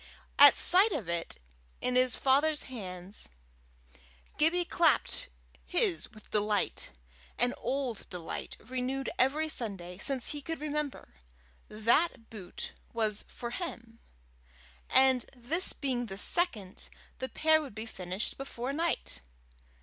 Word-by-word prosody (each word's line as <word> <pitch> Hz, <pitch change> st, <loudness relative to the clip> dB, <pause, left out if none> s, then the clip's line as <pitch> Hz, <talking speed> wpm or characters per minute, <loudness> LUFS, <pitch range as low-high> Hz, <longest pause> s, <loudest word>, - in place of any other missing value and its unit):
At -, -, +9 dB
sight 385 Hz, +5 st, +7 dB
of 235 Hz, -, -3 dB
it 170 Hz, -1 st, -3 dB, 0.4 s
in 250 Hz, -, -1 dB
his 255 Hz, -1 st, +4 dB
father's 295 Hz, +3 st, +3 dB
hands, 190 Hz, -, -8 dB, 1.1 s
Gibbie 340 Hz, +3 st, +4 dB
clapped 330 Hz, -3 st, +2 dB, 0.3 s
his 155 Hz, -, 0 dB
with 215 Hz, -2 st, -17 dB
delight 210 Hz, -1 st, 0 dB, 0.5 s
an 245 Hz, +1 st, +2 dB
old 260 Hz, -5 st, -2 dB
delight, 175 Hz, -3 st, -6 dB
renewed 260 Hz, +1 st, -3 dB
every 295 Hz, +5 st, +3 dB
Sunday 195 Hz, -, -1 dB
since 260 Hz, +4 st, +1 dB
he 295 Hz, -, -5 dB
could 325 Hz, +2 st, -5 dB
remember. 300 Hz, -, -4 dB, 0.6 s
That 230 Hz, +4 st, +1 dB
boot 190 Hz, -5 st, -6 dB, 0.2 s
was 215 Hz, -2 st, -1 dB
for 235 Hz, -1 st, -7 dB
him! 235 Hz, -7 st, -7 dB, 0.9 s
and 260 Hz, -2 st, +4 dB
this 290 Hz, +10 st, +1 dB
being 250 Hz, -4 st, -2 dB
the 195 Hz, -2 st, -7 dB
second, 210 Hz, -, -2 dB, 0.3 s
the 260 Hz, -, -3 dB
pair 315 Hz, 0 st, +3 dB
would 275 Hz, -9 st, -9 dB
be 220 Hz, +1 st, -5 dB
finished 185 Hz, 0 st, -4 dB
before 270 Hz, -1 st, -4 dB
night! 315 Hz, -, -2 dB
250 Hz, 120 wpm, -31 LUFS, 210-295 Hz, 1.1 s, At